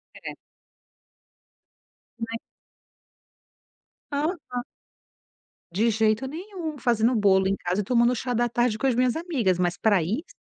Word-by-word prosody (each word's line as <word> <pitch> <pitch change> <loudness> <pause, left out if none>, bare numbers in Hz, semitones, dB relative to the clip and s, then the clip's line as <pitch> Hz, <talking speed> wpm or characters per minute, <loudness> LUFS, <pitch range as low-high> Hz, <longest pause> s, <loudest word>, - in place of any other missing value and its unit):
É. - - -7 1.8
Né. 230 0 -4 1.7
Aham. 285 -4 -2 1.1
De 220 +6 +2
jeito 220 +3 +1
nenhum, 325 0 -6
fazendo 235 0 +2
bolo 190 -3 +4
em 195 - +1
casa 180 +1 -1
e - - -4
tomando 240 +3 +3
chá 250 +1 -3
da 240 +1 +1
tarde 240 -1 +1
com 270 - 0
as 250 - +2
minhas 250 0 +2
amigas, 265 - 0
mas 175 -1 0
pra 205 -5 +3
isso, 220 - -3
235 Hz, 125 wpm, -25 LUFS, 210-265 Hz, 1.8 s, bolo